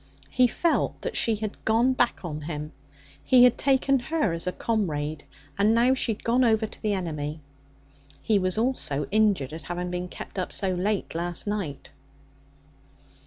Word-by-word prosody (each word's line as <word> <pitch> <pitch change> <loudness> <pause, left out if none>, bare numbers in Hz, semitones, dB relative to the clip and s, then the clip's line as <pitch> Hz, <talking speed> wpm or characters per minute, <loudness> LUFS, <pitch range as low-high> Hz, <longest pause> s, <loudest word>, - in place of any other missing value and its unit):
He 250 0 +4
felt 335 +7 0
that - - -3
she 225 - +2
had 215 0 -6
'gone 235 +4 +3
back 245 -6 0
on 155 -2 -5
him.' 150 -1 -5 0.5
He 250 -1 +6
had 250 -1 +6
taken 275 0 +2
her 295 - 0
as 165 +1 -4
a - - +1
comrade, 155 -10 -2 0.3
and 215 +3 +4
now 245 +3 +4
she 255 -3 0
had 210 - -13
gone 245 +3 +3
over 220 -2 +3
to - - -10
the 210 -1 0
enemy. 155 -4 -4 0.8
He 210 +6 +2
was 185 +1 -1
also 220 - 0
injured 200 -10 +2
at 160 - -7
having 175 +3 -4
been 180 0 -3
kept 185 - -8
up 185 - -3
so 190 -2 0
late 195 +3 -1
last 175 +1 -3
night. 200 -9 -4
205 Hz, 170 wpm, -26 LUFS, 170-230 Hz, 0.8 s, He